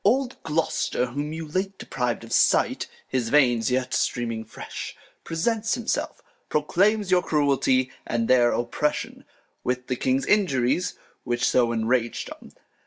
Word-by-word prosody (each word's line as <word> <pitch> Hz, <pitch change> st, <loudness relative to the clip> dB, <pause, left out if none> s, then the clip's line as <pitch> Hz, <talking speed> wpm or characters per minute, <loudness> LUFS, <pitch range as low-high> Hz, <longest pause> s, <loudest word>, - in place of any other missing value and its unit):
Old 255 Hz, +5 st, +1 dB
Gloster, 160 Hz, -5 st, 0 dB
whom 145 Hz, +5 st, -4 dB
you 160 Hz, 0 st, -5 dB
late 190 Hz, +5 st, -2 dB
depriv'd 125 Hz, -2 st, -2 dB
of 115 Hz, -, -7 dB
Sight, -, -, +3 dB, 0.2 s
(His 125 Hz, -3 st, -1 dB
Veins 120 Hz, -6 st, +4 dB
yet 130 Hz, 0 st, 0 dB
streaming 115 Hz, -2 st, -1 dB
fresh,) 110 Hz, -, -7 dB, 0.3 s
presents 220 Hz, +7 st, 0 dB
himself. 235 Hz, -2 st, -3 dB, 0.3 s
Proclaims 195 Hz, +7 st, +2 dB
your 180 Hz, -1 st, +5 dB
Cruelty, 135 Hz, -4 st, +2 dB, 0.2 s
and 115 Hz, -1 st, 0 dB
their 120 Hz, -2 st, +5 dB
Oppression, 120 Hz, +5 st, -2 dB, 0.4 s
With 125 Hz, 0 st, -1 dB
the 125 Hz, -, -1 dB
King's 130 Hz, +2 st, 0 dB
Injuries; 175 Hz, -, +2 dB, 0.3 s
which 120 Hz, -1 st, 0 dB
so 120 Hz, -2 st, +3 dB
enrag'd 115 Hz, +1 st, 0 dB
'em. -, -, -11 dB
130 Hz, 135 wpm, -25 LUFS, 120-170 Hz, 0.4 s, your